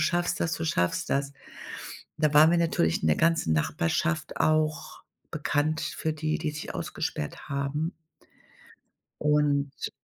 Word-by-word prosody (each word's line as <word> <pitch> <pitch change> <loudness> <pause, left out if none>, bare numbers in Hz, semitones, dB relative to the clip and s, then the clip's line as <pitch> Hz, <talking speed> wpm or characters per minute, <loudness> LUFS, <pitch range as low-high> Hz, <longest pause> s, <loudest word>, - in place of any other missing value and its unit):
schaffst 175 +2 +1
das, 165 - 0
du 160 0 -2
schaffst 90 - 0
das.“ 140 0 0 0.8
Da 155 -1 +2
waren 155 +2 +8
wir 175 - +3
natürlich 85 - +1
in 80 - +2
der 75 - +4
ganzen 165 - +2
Nachbarschaft 155 - 0
auch 155 -2 0 0.3
bekannt 150 +1 0
für 160 - -2
die, 155 0 -1
die 160 -2 -2
sich 150 +1 -6
ausgesperrt 75 - -4
haben 145 +4 -2 1.3
und 145 -2 +1
150 Hz, 130 wpm, -27 LUFS, 140-160 Hz, 1.3 s, waren